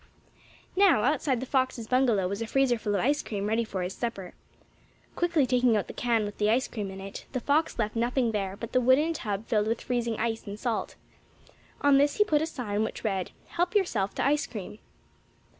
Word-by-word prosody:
Now, 375 - +5
outside 265 -2 +1
the - - -3
fox's 255 -3 0
bungalow 235 -6 +2
was 200 +3 -4
a 230 - -2
freezer 260 -2 +2
full 205 -2 -1
of 195 - +1
ice 290 +4 +2
cream 200 -2 -4
ready 220 +2 +1
for 195 -4 -4
his 180 +1 -3
supper. 200 -6 -5 0.8
Quickly 335 -5 +2
taking 250 -3 +3
out 205 - -1
the - - -9
can 230 -3 +1
with 205 - -7
the 210 0 +2
ice 245 +4 +2
cream 210 -4 -5
in 190 0 -8
it, 195 +1 -8
the 255 - 0
fox 290 +5 +1
left 215 -1 -1
nothing 240 +1 +1
there 195 -2 -3
but 230 - -7
the 255 - +3
wooden 270 +7 +4
tub 210 -7 -4
filled 215 -2 +1
with 230 +1 0
freezing 235 -2 -2
ice 225 -1 -2
and 200 +1 -6
salt. 235 -3 -2 0.9
On 285 -1 +5
this 285 +1 +3
he 420 - +5
put 305 -8 +1
a 315 - 0
sign 215 -9 -3
which - - -5
read: 195 -4 -1 0.2
"Help 350 +4 -1
yourself 225 - +1
to - - 0
ice 295 +1 +2
cream." 210 -1 -8
235 Hz, 210 wpm, -28 LUFS, 210-270 Hz, 0.9 s, Now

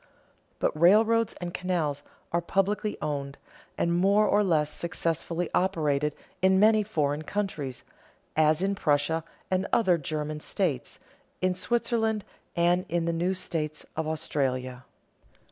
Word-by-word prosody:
But - - 0
railroads 220 +7 +4
and 175 -1 -6
canals 170 -7 -1 0.3
are 170 - +1
publicly 200 +4 0
owned, 140 -2 -3 0.4
and 170 - +1
more 200 +4 +4
or 210 0 +3
less 155 -5 +2
successfully 170 0 -2
operated, 150 -5 +1 0.3
in 190 0 +4
many 215 +1 +5
foreign 150 -8 -1
countries, 155 -7 -3 0.5
as 155 +2 +3
in 195 +1 +1
Prussia 155 -2 +1 0.3
and 185 0 +1
other 185 -7 +3
German 150 0 -3
states, 150 -5 -2 0.4
in 185 0 +1
Switzerland, 225 +1 0 0.3
and 175 +1 +2
in 170 0 0
the 170 - 0
new 175 +3 0
states 155 -4 -4
of 160 0 -2
Australia. 130 -5 -2
170 Hz, 130 wpm, -28 LUFS, 150-195 Hz, 0.5 s, many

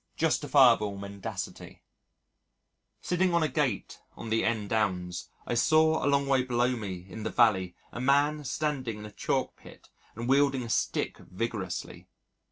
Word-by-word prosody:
Justifiable 130 -10 +4
Mendacity 100 0 -7 1.2
Sitting 180 0 +1
on 170 - +3
a - - +2
gate 140 -10 -2
on 115 - -7
the 115 - +2
N. 110 -3 0
Downs 90 -5 -1 0.2
I - - -2
saw 155 +5 +3
a 140 - +2
long 140 0 +2
way 135 -1 +3
below 125 0 +1
me 95 -6 -6
in 110 - -8
the 110 - -2
valley 95 -8 +2 0.2
a 120 - -6
man 145 +3 +2
standing 135 -5 -2
in 105 - -8
a 105 - -9
chalk - - -2
pit - - -16 0.3
and 120 +2 -5
wielding 135 -1 +3
a 115 - -7
stick - - -1
vigorously. 95 -2 -5
120 Hz, 155 wpm, -29 LUFS, 105-140 Hz, 1.2 s, Justifiable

